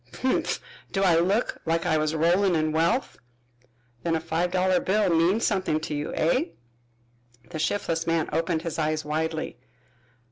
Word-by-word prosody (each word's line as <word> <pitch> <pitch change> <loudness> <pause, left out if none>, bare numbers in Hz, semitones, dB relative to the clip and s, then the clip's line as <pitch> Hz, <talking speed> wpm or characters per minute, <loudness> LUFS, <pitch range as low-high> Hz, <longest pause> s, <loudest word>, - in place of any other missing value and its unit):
"Humph! 260 - +1 0.3
Do 195 - 0
I 170 -3 +5
look 195 +7 0
like 165 +1 0
I 160 -3 +2
was 155 +1 0
rollin' 175 +4 +3
in 155 -1 +1
wealth?" 170 +12 0 0.8
"Then 165 -1 0
a - - +1
five 165 +2 -1
dollar 185 0 +2
bill 205 +2 +1
means 180 +7 +3
something 185 -5 +1
to 155 - -5
you, 145 +1 -3
eh?" 215 - +2 1.1
The 160 - -5
shiftless 165 -1 -1
man 165 -1 +1
opened 165 0 0
his 165 -1 -4
eyes 155 0 0
widely. 160 -3 -2
165 Hz, 155 wpm, -26 LUFS, 160-185 Hz, 1.1 s, I